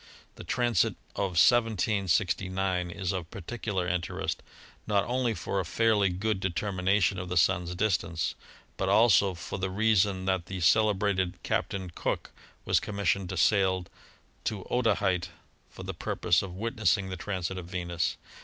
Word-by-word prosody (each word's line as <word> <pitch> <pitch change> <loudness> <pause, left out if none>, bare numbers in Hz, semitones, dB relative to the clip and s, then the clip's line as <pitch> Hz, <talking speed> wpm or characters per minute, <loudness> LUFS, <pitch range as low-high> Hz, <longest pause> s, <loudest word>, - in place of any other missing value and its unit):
The - - -10
transit 120 -7 +1 0.2
of 95 -4 -2
1769 95 -4 +2
is 90 0 -3
of 90 -4 -4
particular 100 -1 -3
interest, 90 -1 -2 0.5
not 100 -1 +2
only 120 -2 0
for 100 - -2
a - - 0
fairly 105 +2 +2
good 95 +3 -1
determination 95 +1 +1
of 90 0 -5
the 90 - -1
Sun's 90 0 +2
distance, 90 -4 0 0.4
but 95 - -1
also 100 -2 +5
for 95 +3 -6
the 95 0 -1
reason 100 -2 +2
that 95 -2 0
the 95 -1 -5
celebrated 100 0 +2
Captain 95 -3 -2
Cook - - -3 0.3
was - - +3
commissioned 100 -2 -1
to 95 - -4
sail 95 0 +3 0.6
to 100 -4 -3
Otaheite 100 -7 +1 0.4
for - - -10
the - - -4
purpose 85 -2 +1
of 95 -2 -7
wit 115 +4 -4
nessing 100 -3 +2
the - - -3
transit 95 -1 -3
of 85 - -8
Venus. 85 -2 -2
95 Hz, 145 wpm, -29 LUFS, 90-105 Hz, 0.6 s, also